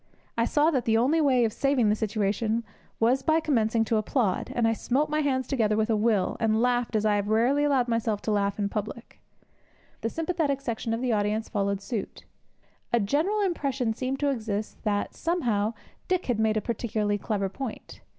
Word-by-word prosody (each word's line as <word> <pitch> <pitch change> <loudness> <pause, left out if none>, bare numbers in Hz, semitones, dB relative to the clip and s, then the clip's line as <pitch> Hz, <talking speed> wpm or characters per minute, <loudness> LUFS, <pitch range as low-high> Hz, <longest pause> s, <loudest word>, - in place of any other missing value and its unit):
I 230 - +2
saw 300 +5 +3
that 260 -5 0
the 225 -2 +3
only 280 +8 +3
way 255 -5 +4
of 220 - -1
saving 275 -6 +2
the 210 - +3
situation 215 +1 -1 0.4
was 245 +4 +3
by 315 +3 +3
commencing 230 -7 +1
to 225 - +1
applaud, 215 -2 0
and 235 -2 +2
I 225 - +2
smote 270 +7 0
my 305 - +1
hands 265 -3 0
together 220 -6 +1
with 220 +1 +1
a - - +3
will, 210 -3 +1
and 220 -1 +2
laughed 245 -1 +1
as 215 0 +1
I 210 -1 +3
have 205 0 -2
rarely 245 +7 +3
allowed 270 -4 +2
myself 230 -3 0
to 220 - -1
laugh 200 -1 0
in 205 -1 0
public. 215 +3 -6 0.8
The 225 - -1
sympathetic 320 -2 -1
section 230 -3 -2
of 230 - -5
the 250 -2 +1
audience 210 +1 0
followed 200 -2 -1
suit. 225 -3 -5 0.7
A 240 - +3
general 310 - +1
impression 275 - -1
seemed 260 +3 -3
to 290 - +2
exist 215 -4 -4
that, 205 -1 0
somehow, 235 - 0 0.3
Dick 370 -1 0
had 240 -4 0
made 220 0 +2
a - - +1
particularly 210 -2 -1
clever 200 -2 -1
point. 230 +4 -7
230 Hz, 195 wpm, -27 LUFS, 215-270 Hz, 0.8 s, way